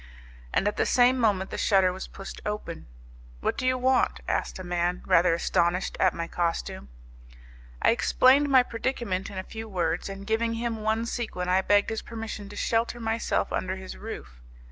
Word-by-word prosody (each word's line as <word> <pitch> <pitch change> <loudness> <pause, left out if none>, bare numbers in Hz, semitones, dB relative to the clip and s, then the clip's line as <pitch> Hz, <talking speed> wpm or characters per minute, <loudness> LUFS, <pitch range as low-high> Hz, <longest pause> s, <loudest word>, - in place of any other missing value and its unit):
And 200 - +1
at 205 - -1
the - - +2
same 255 +1 +4
moment 200 -5 +1
the - - -4
shutter 190 -3 +3
was 190 - -6
pushed 195 - -9
open. 210 - -5 0.5
"What - - -1
do 255 - -2
you 255 0 +2
want?" 255 0 +2
asked - - -1
a 185 - -7
man, 175 0 -1
rather 170 0 +4
astonished 170 +2 +1
at 185 -2 +3
my 165 0 -3
costume. 165 - -2 0.9
I - - +6
explained 265 +4 +4
my 260 -2 +6
predicament 230 -6 -2
in 195 - -8
a 185 - -3
few 220 +2 -8
words, 175 -1 -1
and 195 0 -7
giving 230 +2 0
him 230 0 -2
one 220 +1 0
sequin 215 -7 -3
I 185 +1 +4
begged 205 +2 +3
his 220 - -2
permission 220 -3 -7
to 205 - -10
shelter 230 +3 0
myself 225 0 -1
under 185 0 -1
his 190 -1 -8
roof. 65 - -9
205 Hz, 185 wpm, -27 LUFS, 185-230 Hz, 0.9 s, I